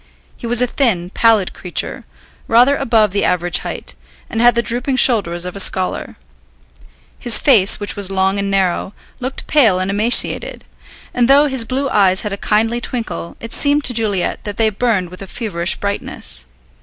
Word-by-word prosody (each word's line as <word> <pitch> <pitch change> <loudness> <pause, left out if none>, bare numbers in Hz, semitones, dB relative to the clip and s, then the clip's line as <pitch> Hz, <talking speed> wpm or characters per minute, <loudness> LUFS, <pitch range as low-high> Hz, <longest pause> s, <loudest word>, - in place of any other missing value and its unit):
He 235 - -8
was 240 +1 +2
a - - +3
thin, 210 -9 -1
pallid 220 -5 +2
creature, 180 - -4 0.4
rather 245 +5 +4
above 225 -7 +1
the 200 - -1
average 175 -1 +1
height, - - -7 0.4
and 225 - -2
had 240 0 +5
the 235 - 0
drooping 245 +3 -1
shoulders 190 -10 +2
of 180 - -7
a - - -6
scholar. 185 -1 0 1.0
His 240 - +3
face, 220 -9 +4
which 205 - -3
was 200 -2 -2
long 195 +1 0
and 200 0 -2
narrow, 190 0 -1 0.2
looked 255 +1 -6
pale 230 -11 +3
and 185 +1 -2
emaciated, 215 +4 +2 0.5
and 245 -1 +1
though 280 +2 +5
his 265 -5 0
blue 265 +3 -2
eyes 195 -6 +2
had 210 -2 -4
a - - -4
kindly 225 +4 0
twinkle 90 - -6
it 230 - -8
seemed 290 0 +1
to 250 - 0
Juliet 210 -5 -1
that 205 -1 -7
they 220 -1 +2
burned 205 -5 -1
with 185 - -12
a 195 - -8
feverish 190 -6 -1
brightness. 65 - -2
215 Hz, 180 wpm, -16 LUFS, 190-240 Hz, 1.0 s, had